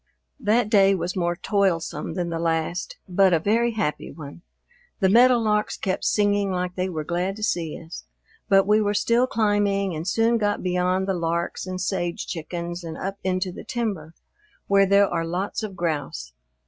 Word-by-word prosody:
That 225 -1 +2
day 195 -2 +5
was 175 0 -3
more 175 -2 0
toilsome 185 -4 -1
than 175 -2 -2
the 165 - -2
last, 165 +2 -2
but 185 0 +3
a 165 - +4
very 230 +6 +1
happy 150 -9 -2
one. 150 +1 -10 0.6
The 190 -3 +3
meadowlarks 225 -2 +4
kept 185 -2 -2
singing 205 -1 +2
like 180 -1 -2
they 185 +1 -2
were 160 -4 -4
glad 180 +4 -2
to 215 - -8
see 165 -6 -1
us. 165 +1 -10 0.4
But 195 -1 +5
we 210 +2 +4
were 205 0 0
still 235 +4 +2
climbing 205 -4 +1
and 160 +3 -5
soon 225 +4 +2
got 205 -1 0
beyond 180 +1 0
the 195 - +1
larks 170 +1 -2
and 185 0 -4
sage 175 -2 -2
chickens 170 +1 -5
and 160 -1 -6
up 195 +1 -5
into 185 0 -1
the - - -9
timber, 200 -10 -4 0.5
where 195 0 +4
there 200 +1 +5
are 170 -2 -1
lots 180 +7 -3
of 210 -3 -5
grouse. 145 - -3
185 Hz, 175 wpm, -24 LUFS, 170-205 Hz, 0.6 s, day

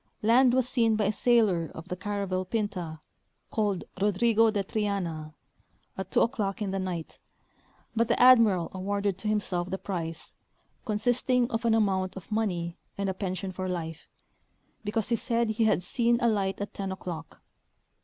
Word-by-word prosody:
Land 245 +3 +5
Avas 260 0 +4
seen 230 -2 +2
by 215 -1 +1
a 205 - +2
sailor 210 -7 +2
of 160 +2 -9
the 180 - -2
caravel 195 -1 -2
Pinta, 185 -6 -3 0.5
called 205 -4 0 0.2
Rodrigo 225 +3 +4
de 205 -2 0
Triana, 180 -7 -3 0.6
at 190 -1 -5
2 - - +3
o'clock 210 -5 0
in 205 -3 -2
the 195 - -1
night, 180 -4 -5 0.8
but 230 0 +2
the 235 - +1
ad 255 0 +9
miral 190 -7 +2
awarded 200 0 -2
to 215 - -4
himself 185 -4 0
the 190 - -2
prize, 165 -5 -5 0.5
consisting 245 +3 +1
of 230 +1 -2
an 225 -1 +4
amount 190 -4 +1
of 190 +2 -10
money 180 -6 -1 0.2
and 200 -1 -1
a - - -1
pension 185 0 -3
for 185 0 -4
life, 165 -3 -5 0.8
because 220 +2 -1
he 235 - +3
said 230 0 0
he 220 +1 +1
had 195 -4 +2
seen 235 +5 +2
a 235 - +2
light 195 -4 0
at 205 - -5
10 195 -1 -4
o'clock. 170 -4 -7
200 Hz, 170 wpm, -28 LUFS, 185-225 Hz, 0.8 s, ad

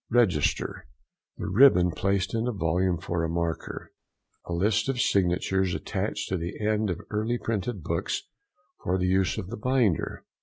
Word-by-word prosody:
REGISTER.—The 90 - -1
ribbon 95 -4 +6
placed 95 +1 0
in 115 +1 0
a - - +1
volume 90 -2 +1
for 85 +1 -2
a 80 - -1
marker. 85 -1 -3 0.6
A - - -6
list 105 +7 +1
of 130 -2 -1
signatures 95 -2 +1
attached - - -3
to 95 - 0
the 85 +1 -5
end 105 0 +1
of 85 - -2
early 110 +3 0
printed 105 -4 -3
books - - -2 0.6
for 90 - +1
the 90 - 0
use 95 0 +2
of 95 - -5
the 120 - -4
binder. 120 - 0
95 Hz, 155 wpm, -27 LUFS, 90-110 Hz, 0.6 s, ribbon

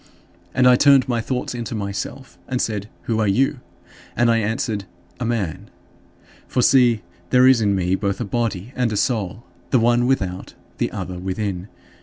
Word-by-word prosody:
And 125 -1 +5
I 125 -1 +7
turned 140 -2 +5
my 120 -2 0
thoughts 125 +2 -3
into 120 -1 -4
myself 100 +6 -5
and 130 -1 -2
said, 105 -3 -2
"Who 110 -1 -1
are 110 - +2
you?" 135 +7 +2 0.6
And 120 0 +3
I 115 - +3
answered, 110 -1 -2 0.3
"A 125 - -2
man." 110 -9 -2 0.8
For 125 - +1
see, 120 -6 +4 0.3
there 125 0 +5
is 130 -3 +5
in 100 -2 +2
me 90 -1 0
both 100 0 -1
a 120 - -2
body 115 0 -2
and 125 -3 0
a 105 - -1
soul; 110 -1 -1 0.3
the - - +4
one 120 +1 +3
without, 95 -9 -2 0.2
the - - +1
other 90 -1 -5
within. 95 0 -3
115 Hz, 175 wpm, -21 LUFS, 100-125 Hz, 0.8 s, I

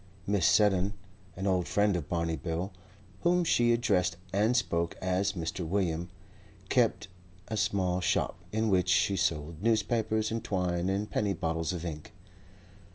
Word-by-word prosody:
Mrs. 100 -3 +1
Seddon, 100 -1 +4 0.4
an 95 - -4
old 90 -3 +1
friend 105 -1 +2
of 85 -5 -4
Barney 85 -1 0
Bill, 85 +3 -3 0.5
whom 175 +1 +3
she 120 -7 +3
addressed 90 -7 +1 0.2
and 110 +5 +3
spoke 85 -8 -1
as 95 +2 0
Mr. 85 0 -4
William, 85 -1 -1 0.6
kept 120 -3 +2 0.4
a 110 - -2
small 95 -4 0
shop - - 0
in 110 +1 0
which 90 -2 +2
she 100 +2 +3
sold 80 -2 -1
newspapers 110 0 +1
and 115 0 -2
twine 90 -3 -1
and 100 +2 -2
penny 100 -2 0
bottles 80 -1 -2
of 90 -1 -5
ink. 75 -3 -6
95 Hz, 150 wpm, -30 LUFS, 85-105 Hz, 0.6 s, Seddon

